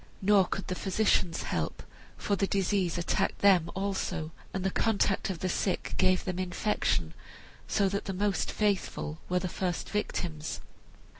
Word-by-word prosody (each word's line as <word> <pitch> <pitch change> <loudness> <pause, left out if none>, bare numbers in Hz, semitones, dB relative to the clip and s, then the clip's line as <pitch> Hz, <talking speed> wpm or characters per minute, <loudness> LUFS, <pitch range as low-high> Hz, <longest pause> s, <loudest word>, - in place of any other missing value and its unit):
Nor 195 -1 +5
could 195 - -3
the - - -2
physicians 190 -2 +1
help, - - -2 0.3
for 200 - 0
the 195 0 +1
disease 190 -3 +1
attacked 170 - 0
them 185 -5 +5
also, 190 -4 -2 0.2
and 190 - -3
the 190 - +1
contact 200 -3 +1
of 180 -4 -4
the 185 - 0
sick 185 +1 -1
gave 185 -1 +3
them 185 -1 -2
infection, 90 - 0 0.5
so 200 - +2
that 200 +1 -2
the 195 - -2
most 195 -1 0
faithful 195 -6 -1
were 180 - +2
the 180 0 0
first 180 -1 -3
victims. 165 -6 -2
185 Hz, 155 wpm, -30 LUFS, 175-200 Hz, 0.5 s, Nor